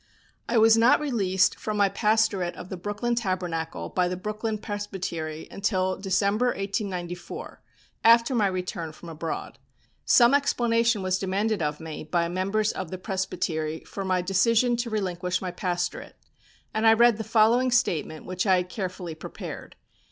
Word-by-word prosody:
I 235 - +2
was 225 0 +7
not 230 +2 +5
released 200 -10 +1
from 215 -1 -3
my 200 -1 +4
pastorate 210 -4 +1
of 180 - -9
the - - -4
Brooklyn 205 +6 -2
Tabernacle 180 -7 -2
by 180 -1 +1
the 180 0 -3
Brooklyn 215 +3 -3
Presbytery 185 -7 -5
until 190 -2 0
December, 200 +4 +1
1894, 195 - -4 0.4
after 230 +2 +6
my 215 -5 +3
return 180 -4 -4
from 170 +2 -11
abroad. 165 0 -5 0.4
Some 240 +1 +5
explanation 235 -6 +2
was 185 0 0
demanded 200 +2 0
of 150 -1 -1
me 160 -2 -7
by 170 +2 0
members 195 +4 0
of 185 -3 -5
the 185 - -5
Presbytery 180 -5 -3
for 195 - -7
my 185 -1 0
decision 230 +6 +3
to 235 0 -2
relinquish 185 -4 -1
my 185 -1 -4
pastorate, 175 -1 -3 0.6
and 220 +1 +2
I 225 - +8
read 235 0 +5
the 220 - -3
following 230 +3 +3
statement 160 -10 0
which 185 +2 -2
I 190 - +6
had 180 0 -1
carefully 185 -4 -5
prepared. 155 - -8
195 Hz, 155 wpm, -26 LUFS, 180-220 Hz, 0.6 s, I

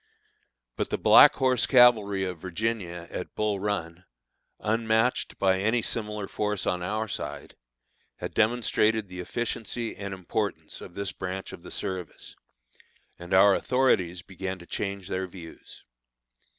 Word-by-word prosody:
But - - -1
the - - -1
Black - - +8
Horse 130 -3 +2
Cavalry 110 -7 +5
of 90 -3 -4
Virginia, 90 -2 -3
at 90 - -6
Bull 105 -2 0
Run, 90 -4 -3 0.6
unmatched 115 +2 +1
by 95 -1 +2
any 110 +4 +1
similar 105 -3 -3
force 105 -2 -2
on 90 - 0
our 105 +5 -2
side, - - -6 0.6
had - - -6
demonstrated 110 -1 +2
the 90 0 -8
efficiency 115 +3 -3
and 100 -1 -6
importance 95 -3 -4
of 85 - -11
this 100 -1 -3
branch 95 +1 -5
of - - -10
the - - -11
service, 90 -3 -5 0.8
and 85 +1 -10
our 95 +1 +7
authorities 95 -9 +1
began 95 0 -5
to 85 - -13
change 100 0 -4
their 95 -1 -2
views. 85 -2 -12
100 Hz, 135 wpm, -27 LUFS, 90-110 Hz, 0.8 s, Black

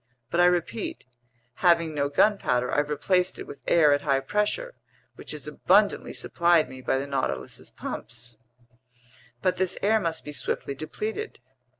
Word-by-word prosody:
But 170 - 0
I 175 - +7
repeat: 180 +5 -1 0.6
having 170 -3 +4
no 140 -1 0
gunpowder, 145 - +2
I've 145 0 +1
replaced 180 +5 +1
it - - -7
with - - -10
air 155 -4 +5
at 145 - +1
high 140 -2 +1
pressure, 210 - -1 0.4
which - - -9
is - - -5
abundantly - - +2
supplied 170 -4 +2
me 130 0 -10
by 130 - +1
the 135 - -2
Nautilus's 140 -2 -3
pumps." 115 0 -7 1.0
"But 185 - +2
this 185 -1 0
air 220 +2 +4
must 165 -5 -2
be 150 - -5
swiftly 140 -1 -2
depleted." 215 - -5
160 Hz, 155 wpm, -26 LUFS, 140-185 Hz, 1.0 s, I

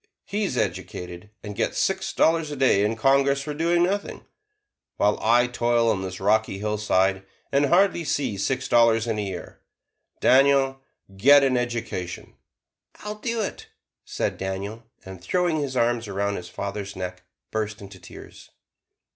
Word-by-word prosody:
he 205 +2 -2
is 125 - -3
educated 90 -1 -4
and 105 -2 -7
gets - - -1
six - - 0
dollars 160 -1 +2
a 145 - -5
day 130 -7 +3
in 105 +2 0
Congress 140 +3 +2
for 150 +1 -4
doing 170 +3 +2
nothing; 200 +3 -2 0.7
while 105 +1 +2
I 120 +2 +4
toil 120 -1 +1
on 95 - -1
this 95 -1 -6
rocky 105 +1 +1
hillside 100 -2 0 0.3
and 140 +1 +3
hardly 180 +1 +3
see 145 -8 -1
six 130 +6 -1
dollars 115 -1 +4
in 110 -2 -2
a - - 0
year. 95 -3 -7 0.6
Daniel, 135 0 +4 0.3
get 140 +8 +6
an 130 -2 +2
education!" 120 -7 -4 0.7
"I'll 210 0 -5
do 230 +1 -2
it," 205 - -5 0.4
said - - -3
Daniel, 100 +4 -5 0.2
and 95 -2 -10
throwing 175 -3 0
his 135 -3 -3
arms 120 -1 +1
around 100 +1 -2
his 90 0 -8
father's 100 +1 -5
neck, 90 -1 -6 0.3
burst 110 0 -3
into 100 -1 -12
tears. - - -13
115 Hz, 155 wpm, -24 LUFS, 100-140 Hz, 0.7 s, get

